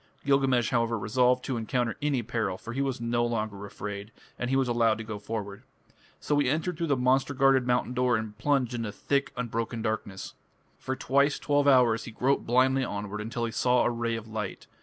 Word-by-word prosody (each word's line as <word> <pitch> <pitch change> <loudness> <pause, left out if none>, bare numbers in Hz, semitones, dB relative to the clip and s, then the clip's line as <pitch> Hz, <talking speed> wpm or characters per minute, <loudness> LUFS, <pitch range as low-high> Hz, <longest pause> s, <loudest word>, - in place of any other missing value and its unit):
Gilgamesh, 135 -5 +2
however, 115 -1 +1
resolved 125 +5 +2
to 130 - -2
encounter 115 0 -1
any 140 -4 0
peril, 110 -5 -2
for 115 - -8
he 135 - -1
was 135 -3 -1
no 120 0 0
longer 110 -4 -2
afraid, 100 +1 -7 0.3
and 125 - -2
he 135 - +1
was 135 -1 +2
allowed 115 -2 +2
to 115 - -6
go 110 -1 -6
forward. 100 -2 -5 0.6
So 145 -1 +1
he 140 -3 +2
entered 160 +5 -1
through 170 -1 -1
the 140 -3 +2
monster 130 +3 +2
guarded 135 -2 +4
mountain 125 0 +1
door 125 -1 +2
and 110 -1 -5
plunged 135 -4 +1
into 115 -3 -3
thick 140 +6 -1
unbroken 115 -1 -3
darkness. 110 -3 -4 0.5
For 130 - -3
twice 140 +2 +2
twelve 145 -1 +1
hours 125 -4 +4
he 115 - -7
groped 130 +5 0
blindly 130 +2 +3
onward, 105 -2 -4
until 115 +2 -3
he 115 - -3
saw 125 +1 +2
a - - +2
ray 115 -1 -1
of 115 -1 -6
light. 110 -3 -5
120 Hz, 200 wpm, -28 LUFS, 110-130 Hz, 0.6 s, guarded